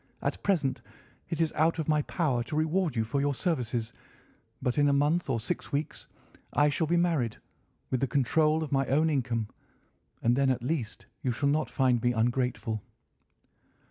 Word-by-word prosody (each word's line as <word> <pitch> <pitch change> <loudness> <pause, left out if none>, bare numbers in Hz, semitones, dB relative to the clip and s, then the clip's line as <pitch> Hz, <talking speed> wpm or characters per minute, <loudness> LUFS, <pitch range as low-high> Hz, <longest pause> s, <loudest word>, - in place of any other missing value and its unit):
At - - -2
present 135 -11 +1 0.5
it 165 - -3
is 165 -2 +1
out 160 +2 +2
of 160 - -2
my 150 -1 +3
power 145 -5 0
to 150 - -5
reward 160 0 +1
you 115 - +1
for 125 +6 -1
your 145 -1 +1
services, 125 - -1 0.7
but 125 +3 0
in 145 0 +4
a - - +3
month 150 +3 +2
or 120 -3 +1
six 110 - -4
weeks 145 +2 -3 0.5
I 145 0 +4
shall 155 +2 0
be 175 +2 +2
married, 160 -10 +1 0.5
with 130 - +1
the 135 - +1
control 155 +4 +2
of 150 - -6
my 135 -1 +1
own 155 +4 +3
income, 120 -6 -1 0.7
and 120 +1 +4
then 135 0 +3
at 130 -2 0
least 125 -5 -3 0.2
you 130 - 0
shall 140 +4 0
not 155 +2 +1
find 130 -4 +2
me 120 0 +2
ungrateful." 120 -1 0
140 Hz, 180 wpm, -29 LUFS, 125-155 Hz, 0.7 s, in